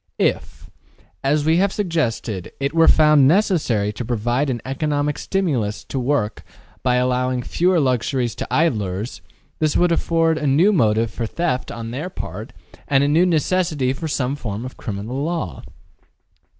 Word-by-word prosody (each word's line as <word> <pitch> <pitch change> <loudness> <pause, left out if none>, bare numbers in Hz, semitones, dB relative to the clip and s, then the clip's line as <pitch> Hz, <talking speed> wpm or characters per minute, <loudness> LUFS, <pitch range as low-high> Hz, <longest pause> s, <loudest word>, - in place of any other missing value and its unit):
If, - - -1 0.6
as 145 +2 +1
we 160 +1 +3
have 195 +2 +2
suggested, 125 - -2
it 140 +1 -1
were 165 0 +4
found 150 -3 +6
necessary 145 - +2
to 120 - -5
provide 120 +4 -1
an 120 -2 -2
economic 145 +2 -1
stimulus 130 - -1
to 135 - -4
work 125 -5 -1 0.4
by 125 -1 +2
allowing 125 0 0
fewer 180 +5 +2
luxuries 125 -2 0
to - - -5
idlers, 110 - -1 0.4
this 155 -1 +1
would 175 -1 +3
afford 165 -1 +1
a 150 - -1
new 165 +10 +4
motive 110 - +2
for 115 - -3
theft 160 -2 -2
on 115 -1 -6
their 145 +9 -4
part 110 - -7 0.4
and 140 -1 +3
a - - +2
new 165 +5 +4
necessity 160 -5 +1
for 160 +4 -5
some 135 -2 -1
form 110 -4 -5
of 130 - -8
criminal 110 +6 -4
law. 155 - -3
135 Hz, 155 wpm, -21 LUFS, 120-160 Hz, 0.6 s, found